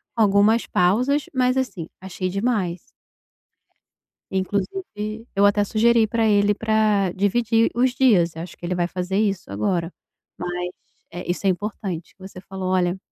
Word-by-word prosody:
algumas 215 +1 +4
pausas 250 +11 +2
mas, 255 -1 +2
assim, 195 -11 -2
achei 185 0 -4
demais. 195 -3 -2 1.4
Eh, 190 - -3
inclusive 210 - -4
eu 200 - +4
até 205 0 +3
sugeri 225 +2 +3
para 225 +1 0
ele 205 -1 +3
para 215 -3 +2
dividir 225 +3 +2
os 255 +2 +3
dias, 180 -12 +3
eu 165 - -5
acho 175 - -10
que - - -14
ele 180 - -1
vai 175 -1 +1
fazer 185 +1 -2
isso 200 - -1
agora, 165 - -1 0.5
mas 180 0 -3 0.4
é, 175 0 -5
isso 185 +2 -2
é - - +5
importante 185 -3 -4
o - - -60
que 190 0 -10
você 185 - -11
falou, 190 0 -5
olha, 180 0 +1
200 Hz, 160 wpm, -22 LUFS, 180-220 Hz, 1.4 s, é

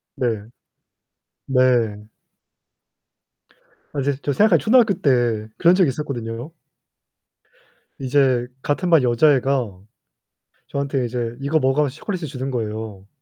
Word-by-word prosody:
네. 115 -5 -1 1.0
네. 120 -5 +1 1.9
아 145 - -3
이제 140 0 -1
저 145 - 0
생각하면 200 -1 +4
초등학교 225 - +4
때 120 - +1
그런 175 +2 +5
적이 185 -6 +3
있었거든요 120 -5 -4
요. 125 +8 -8 1.5
이제 130 -2 +2
같은 160 +7 -1
반 160 -6 +5
여자애가 125 -5 +2 0.9
저한테 140 -2 -2
이제 120 -1 -4
"이거 140 +3 +1
먹어." 135 0 +1
하면서 140 -2 -2
초콜릿을 180 -2 -4
주는 135 0 -5
거예요. 110 -4 -5
130 Hz, 250 characters per minute, -21 LUFS, 120-150 Hz, 1.9 s, 그런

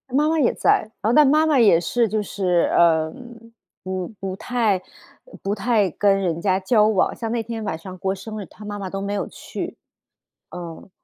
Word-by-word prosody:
妈 300 +2 +3
妈 320 -1 +1
也 250 - +3
在， - - +3 0.2
然 - - -54
后 225 - +2
但 300 +2 +7
妈 310 +3 +4
妈 295 -5 +3
也 200 -7 +6
是 230 +7 +1
就 215 0 -1
是 180 -3 0
呃， 160 -2 +3 0.7
不 185 -1 -3
不 190 -1 -4
太 225 -2 0
呃， 345 - -20
不 200 +1 -1
太 210 -2 +1
跟 195 +3 +2
人 170 -3 -1
家 190 0 +2
交 210 +2 +3
往， 210 -4 +1
像 225 -1 -4
那 235 -1 -1
天 225 0 -5
晚 160 -6 -3
上 185 +2 -9
过 190 +1 -1
生 215 +2 -7
日， 195 - -7
她 210 - -14
妈 205 0 -5
妈 190 -2 -5
都 195 +1 -4
没 200 +1 -3
有 205 - -2
去， - - -7 0.7
嗯。 170 +1 -9
200 Hz, 225 characters per minute, -22 LUFS, 185-225 Hz, 0.7 s, 但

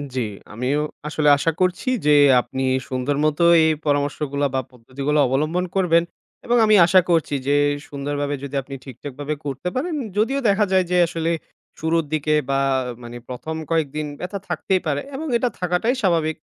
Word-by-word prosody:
জি, 130 - 0 0.3
আমিও 125 +6 -1 0.3
আসলে 150 0 +1
আশা 165 +4 +1
করছি 185 +6 0 0.2
যে 150 - +4 0.3
আপনি 125 +2 -6 0.3
সুন্দর 130 +2 -1
মতো 155 +2 +1 0.2
এই 160 - +4 0.2
পরামর্শগুলা 145 0 0
বা - - +2
পদ্ধতিগুলা 135 +5 -2
অবলম্বন 155 +7 0
করবেন 170 -3 +3 0.4
এবং 240 +1 +2
আমি 215 0 +5
আশা 185 +2 +5
করছি 165 -3 +1
যে 145 - +3 0.3
সুন্দরভাবে 145 0 -3
যদি 140 0 -6
আপনি 135 +1 -9
ঠিকঠাকভাবে 140 +3 -6
করতে 140 +3 -4
পারেন, 310 +6 -2 0.2
যদিও 230 +6 +1
দেখা 205 +1 +3
যায় 185 -1 +3
যে 180 - +3
আসলে 165 0 -2 0.5
শুরুর 165 0 0
দিকে 155 0 +1 0.2
বা 135 0 +2 0.4
মানে 120 0 -8
১ম 135 +6 -5 0.2
কয়েকদিন 155 -2 0
ব্যথা 195 +2 -5
থাকতেই 180 +2 0
পারে 145 -2 0
এবং 315 +4 -4
এটা 245 +1 0
থাকাটাই 180 +8 0
স্বাভাবিক। 165 -5 +1
155 Hz, 160 wpm, -22 LUFS, 140-180 Hz, 0.5 s, আমি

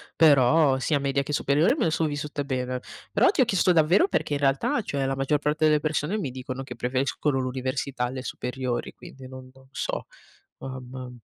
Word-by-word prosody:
però 145 -2 +5
sia 145 +3 +1
media 140 0 0
che 145 +2 -5
superiore 145 - +2
me - - -1
le 160 - +1
sono 160 -1 0
vissute 145 0 -4
bene, 130 -2 -2 0.3
però - - +4
ti 325 - +2
ho - - +5
chiesto 190 -4 +3
davvero 170 - +4
perché 150 - -1
in 145 - 0
realtà, 135 -1 +1
cioè, 140 -1 -2
la 135 0 -1
maggior 135 +2 +1
parte 150 +2 +1
delle 155 -1 +4
persone, 155 +5 -1
mi 150 -11 -3
dicono 130 +1 -6
che 125 -2 -8
preferiscono 135 +3 -1
l'università 130 0 -2
alle 130 +1 -5
superiori, 125 -1 -3
quindi 130 -1 -12
non 130 0 -11
non 135 0 -20
so, - - -4 0.5
mamma. 130 -1 -8
135 Hz, 190 wpm, -26 LUFS, 130-150 Hz, 0.5 s, però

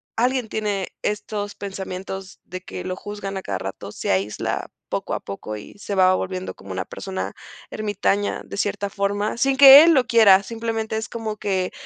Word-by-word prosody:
alguien 250 0 +1
tiene 205 -3 -2
estos 205 0 -3
pensamientos 190 -1 -6
de 185 +1 -8
que - - -7
lo 185 - -3
juzgan 200 0 -6
a - - -4
cada 95 -2 -3
rato. 95 +1 -6
Se - - -3
aísla, 95 +2 -1 0.2
poco - - -3
a - - -1
poco, 105 +2 -7
y 105 - -12
se 200 - -5
va 185 -1 +5
volviendo 185 0 -4
como 100 - -11
una 95 0 -3
persona 190 -1 -5 0.4
ermitaña 205 -1 -1
de - - -8
cierta 200 0 -1
forma, 205 +2 -1
sin 270 +2 +2
que 280 +1 +11
él 335 - +6
lo 260 -4 +3
quiera, 205 -5 +7
simplemente 225 0 -3
es 220 +2 -3
como 220 -2 -5
que 190 -3 -1
200 Hz, 180 wpm, -22 LUFS, 185-220 Hz, 0.4 s, que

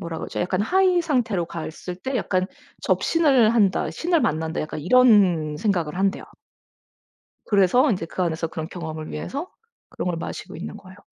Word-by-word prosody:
뭐라 170 -3 -5
그러죠? - - -5
약간 185 +2 0
high 370 - +3
상태로 240 - 0
갔을 170 +2 -7
때 260 +7 -3
약간 185 -4 0 0.4
'접신을 270 -9 +3
한다. 200 -5 +2
신을 340 -1 0
만난다.' 160 +1 -1
약간 155 0 -5
이런 185 -7 +4
생각을 175 -6 -1
한대요. 195 0 0 1.2
그래서 210 +8 +4
인제 185 -6 -1
그 185 - -5
안에서 165 -1 -1
그런 160 -1 -6
경험을 160 -3 -6
위해서 280 - -5 0.4
그런 - - -4
걸 170 -2 -1
마시고 - - -7
있는 175 - -7
거예요. 190 -1 -15
185 Hz, 360 characters per minute, -23 LUFS, 165-245 Hz, 1.2 s, 이런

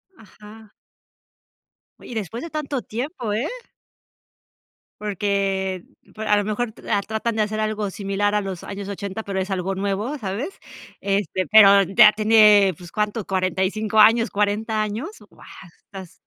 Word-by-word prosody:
Ajá. 215 0 -16 1.3
Oye, - - -12
y - - -6
después 225 - -5
de 335 - -8
tanto 290 -4 -3
tiempo, 245 - -4
¿eh? 225 +7 -1 1.5
Porque 195 -2 -1 0.3
pu 215 - -9
a 210 -1 +3
lo 205 - +1
mejor 215 +3 -2
tratan 220 +2 -2
de 215 - +2
hacer 215 +1 -3
algo 215 -1 -2
similar 200 +1 -1
a 210 - +1
los 190 -3 -6
años 200 0 -7
80, 200 +1 -5
pero 195 -1 -3
es 190 +1 -3
algo 190 0 -2
nuevo, 200 +8 -2
¿sabes? 210 - -4 0.5
Este, 195 -2 -1
pero 200 -2 +8
ya 210 +3 +6
tiene 210 -3 +5
pues 175 -2 -12
¿cuánto? 210 0 -2
¿45 190 +3 -1
años, 225 +2 +5
40 215 +2 0
años? 215 - -3 0.2
Guau, - - -18 0.3
estas. 190 -3 -12
210 Hz, 145 wpm, -22 LUFS, 195-220 Hz, 1.5 s, pero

